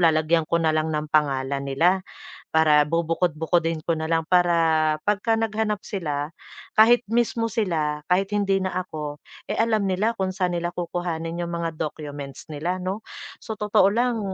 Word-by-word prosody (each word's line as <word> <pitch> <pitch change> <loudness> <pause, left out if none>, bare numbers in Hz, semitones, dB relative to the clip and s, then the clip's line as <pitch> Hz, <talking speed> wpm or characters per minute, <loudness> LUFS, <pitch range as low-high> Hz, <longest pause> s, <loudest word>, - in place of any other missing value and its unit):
lalagyan 160 0 +3
ko 170 0 +2
na 160 -1 +2
lang 155 0 0
ng 150 0 -2
pangalan 140 -2 +1
nila 170 +8 +2 0.5
para 155 -2 +5
bubukod-bukodin 165 0 0
ko 165 - +2
na 160 - -3
lang 165 0 +3
para 165 -3 +3
'pagka 210 +2 +2
naghahanap 215 -1 -1
sila, 150 -6 -3 0.5
kahit 230 +2 +7
mismong 230 -1 +1
sila, 155 -8 -1
kahit 190 +2 +1
hindi 195 -1 +2
na 185 - -1 0.2
ako, 150 -3 -6 0.3
eh, - - -1
alam 220 -2 +2
nila 205 +5 +1
kung 190 -1 0
saan 180 -1 0
nila 175 0 -1
kukuhanin 170 -1 -3
'yong 170 - -3
mga 170 -1 -2
documents 145 -3 -6
nila, 160 +5 -2
'no? 185 +3 -3 0.4
Sa 220 - -5
totoo 210 -1 +3
lang, 235 +2 +1
170 Hz, 160 wpm, -24 LUFS, 155-195 Hz, 0.5 s, kahit